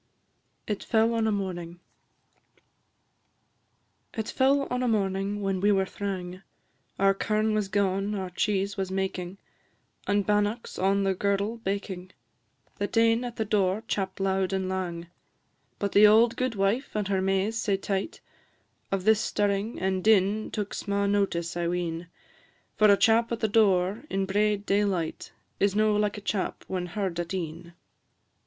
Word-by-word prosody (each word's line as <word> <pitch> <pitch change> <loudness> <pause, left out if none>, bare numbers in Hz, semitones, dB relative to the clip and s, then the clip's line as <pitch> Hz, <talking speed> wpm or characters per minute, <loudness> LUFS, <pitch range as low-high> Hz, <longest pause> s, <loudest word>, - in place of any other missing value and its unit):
IT 210 -2 -3
FELL 225 0 +2
ON 225 -1 +1
A - - +2
MORNING. 175 -4 -4 2.4
It 220 -1 -2
fell 275 +1 +3
on 250 0 0
a 250 - +1
morning 200 -1 -1
when 195 -1 0
we 205 +1 +4
were 195 -1 +2
thrang 185 -2 -5 0.6
Our 195 0 +4
kirn 215 +2 0
was 210 -2 0
gaun, 195 +1 0
our 190 -2 -4
cheese 200 +1 0
was 190 -1 -2
making, 190 -1 -3 0.7
And 205 -1 +1
bannocks 210 +2 0
on 195 +1 +2
the 195 0 +2
girdle 200 +4 -1
baking 190 -3 -4 0.7
That 205 +3 -2
ane 230 +1 +4
at 240 -1 -5
the 220 - -2
door 200 0 +1
chapp'd 190 -1 -2
loud 190 0 0
and 190 -1 -1
lang; 180 -3 -3 0.7
But 200 -1 -2
the 210 +1 +7
auld 225 +2 +5
gudewife, 230 0 -1
and 210 -2 -1
her 195 -1 0
Mays 195 +4 0
sae 200 -3 +1
tight, 195 - -3 0.7
Of 195 -1 -1
this 220 +1 +4
stirring 205 +2 -1
and 190 0 -1
din 210 0 +3
took 205 -2 -4
sma' 200 0 -1
notice, 195 -5 0
I 175 -1 -1
ween; 170 -1 -3 0.7
For 215 - +5
a 200 - +6
chap 230 +2 +3
at 230 - -2
the 220 - +1
door 200 -1 +2
in 195 0 0
braid 205 +1 +1
daylight 195 -6 -1 0.3
Is 200 0 +2
no 215 0 +3
like 210 0 0
a - - -7
chap 200 -1 -3
when 180 -1 -3
heard 185 -1 -3
at 175 +2 -3
e'en. 170 0 -6
200 Hz, 155 wpm, -27 LUFS, 190-215 Hz, 2.4 s, the